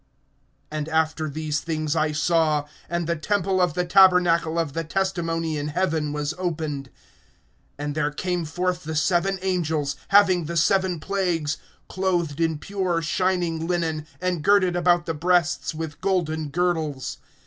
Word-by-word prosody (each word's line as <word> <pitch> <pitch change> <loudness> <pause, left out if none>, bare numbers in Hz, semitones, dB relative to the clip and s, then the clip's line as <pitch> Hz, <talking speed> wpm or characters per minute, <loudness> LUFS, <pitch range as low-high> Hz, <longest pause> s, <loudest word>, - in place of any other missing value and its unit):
(5)And 155 -1 -3
after 160 0 0
these 155 0 -2
things 155 -2 -2
I 155 -1 +1
saw, 155 -1 +2 0.2
and 170 0 -1
the 170 +1 0
temple 190 +2 0
of 175 -4 +1
the 180 - 0
tabernacle 175 -3 +4
of 165 -4 -1
the 165 +1 -2
testimony 165 -3 -1
in 145 - -3
heaven 160 -2 0
was 150 +1 -2
opened; 155 -6 -3 0.9
(6)and 145 0 -3
there 150 -1 0
came 175 +3 -2
forth 180 +3 -2
the 160 +1 -4
seven 175 +4 +2
angels 160 -6 0
having 190 -4 +5
the 170 +2 -3
seven 185 +1 +2
plagues, 170 -5 -1 0.3
clothed 175 -5 -1
in 160 -2 +1
pure, 180 -1 -2
shining 170 -1 0
linen, 160 -3 -1
and 180 -3 -1
girded 190 -2 +4
about 175 0 +3
the 165 - -2
breasts 170 0 +1
with 160 -2 -6
golden 160 -5 0
girdles. 160 -4 -1
165 Hz, 150 wpm, -24 LUFS, 155-180 Hz, 0.9 s, having